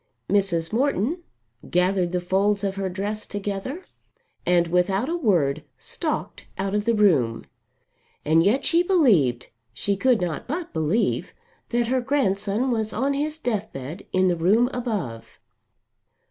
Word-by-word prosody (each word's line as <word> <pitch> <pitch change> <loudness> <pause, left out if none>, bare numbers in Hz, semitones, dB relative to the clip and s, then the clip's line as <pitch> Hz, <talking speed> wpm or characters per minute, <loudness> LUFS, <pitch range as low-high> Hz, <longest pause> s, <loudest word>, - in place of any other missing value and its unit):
Mrs. 190 -4 +1
Morton 275 - 0 0.5
gathered 180 0 +1
the 180 - 0
folds 195 +3 +1
of 195 -1 -1
her 195 -1 -2
dress 205 +3 -4
together 205 - -4 0.6
and 175 -1 +4
without 180 +6 +1
a 335 - -1
word 160 - +1
stalked - - -4
out 195 +1 -2
of 210 0 0
the 230 0 +2
room. 145 - +2 0.8
And 160 +2 +4
yet 230 +9 +2
she 335 - +4
believed, 210 - +3 0.3
she 200 +11 0
could 250 +4 +3
not 175 -3 -3
but 320 +6 -4
believe, 160 +8 0 0.3
that 240 0 +1
her 255 +2 +1
grandson 240 -2 0
was 220 -2 -1
on 270 +5 0
his 300 +2 -2
deathbed 200 - -4
in 185 0 +2
the 180 -1 +3
room 210 +10 +3
above! 205 - -4
200 Hz, 140 wpm, -24 LUFS, 180-245 Hz, 0.8 s, and